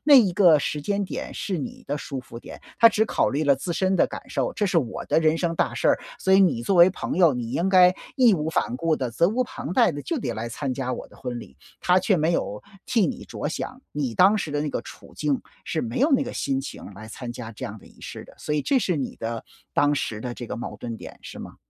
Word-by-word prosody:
那 295 0 +7
一 220 -9 +7
个 175 -5 +6
时 145 0 -2
间 200 +4 0
点 - - -5
是 190 -4 -3
你 140 - -7
的 145 - -1
舒 140 -2 -5
服 120 -2 -9
点， - - -11 0.2
她 230 - +8
只 220 -1 +2
考 - - +1
虑 145 +4 -1
了 140 -1 +5
自 155 +7 -4
身 190 +2 +1
的 - - +4
感 - - -6
受。 - - -1
这 205 - 0
是 180 -3 +3
我 125 -8 -3
的 - - +2
人 160 0 +3
生 170 -1 0
大 - - 0
事 - - -1
儿， - - +2 0.2
所 190 - +3
以 195 - +7
你 135 -12 +3
作 195 - +1
为 175 +1 +8
朋 185 - -4
友， 175 -4 +6
你 120 -1 -4
应 175 +3 +1
该 185 -1 +6 0.2
义 245 -6 +6
无 155 -2 -2
反 125 - 0
顾 160 +3 +1
地、 125 -4 -3
责 170 +9 +3
无 245 +5 +1
旁 175 - -6
贷 180 - +4
地 145 -1 -6
就 330 - -2
得 - - -2
来 115 +2 -4
参 130 +3 -3
加 130 -1 -2
我 - - -5
的 - - -19
婚 125 -2 -5
礼。 65 - -12 0.2
她 180 +1 +4
却 185 +1 +2
没 160 +1 +2
有 105 -10 -2 0.2
替 225 -5 +3
你 250 -1 -4
着 - - -5
想， 255 - -5
你 135 -6 -2
当 195 - +5
时 160 - -3
的 145 0 -1
那 150 - -2
个 - - -2
处 - - -13
境， 145 -3 0 0.3
是 - - -2
没 240 +2 -3
有 280 +6 +3
那 270 - +4
个 - - -6
心 135 -1 -1
情 135 - -8
来 110 +3 -10
参 120 +2 -7
加 120 -1 -7
这 105 - -12
样 105 +2 -8
的 - - -17
仪 - - -19
式 - - -8
的。 - - -16
所 150 - -2
以 150 - +1
这 275 - +3
是 185 -8 0
你 135 -3 -3
的 115 0 -4 0.3
当 145 0 +3
时 110 -6 -2
的 125 - -4
这 120 0 -7
个 - - -5
矛 120 - -6
盾 115 -2 -5
点 - - -11
是 - - -9
吗？ - - -9
155 Hz, 300 characters per minute, -25 LUFS, 130-190 Hz, 0.3 s, 她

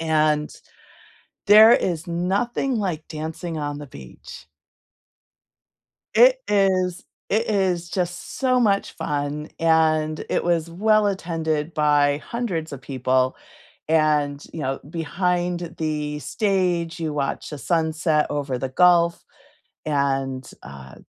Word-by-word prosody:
And, 155 -2 +1 1.0
there 215 +3 +9
is 170 -5 0
nothing 200 +10 -1
like 180 -8 -2
dancing 160 +1 -5
on 145 -1 -4
the 145 - -9
beach. 70 - -12 1.7
It 255 +3 +6
is 190 -3 +1 0.3
it 220 +3 +1
is 180 -4 0
just 180 -1 -4
so 255 -2 +2
much 200 -4 +1
fun, 145 +1 -3
and 155 -1 +2
it - - 0
was 170 -1 0
well 215 +4 +2
attended 165 -4 -2
by 145 -1 +3
hundreds 185 -11 -3
of 135 -2 -8
people. 130 -1 0 0.5
And, 150 -2 +2
you 160 - -6
know, 135 0 -2
behind 175 +1 -2
the 150 -2 -2
stage, 175 - -1
you 155 -2 -3
watch 140 -2 -3
the 150 - -7
sunset 160 -1 0
over 140 -3 -2
the 130 +2 -4
Gulf, 170 +3 +3 0.6
and, 135 -3 -1
uh 65 0 -11
160 Hz, 115 wpm, -23 LUFS, 150-180 Hz, 1.7 s, there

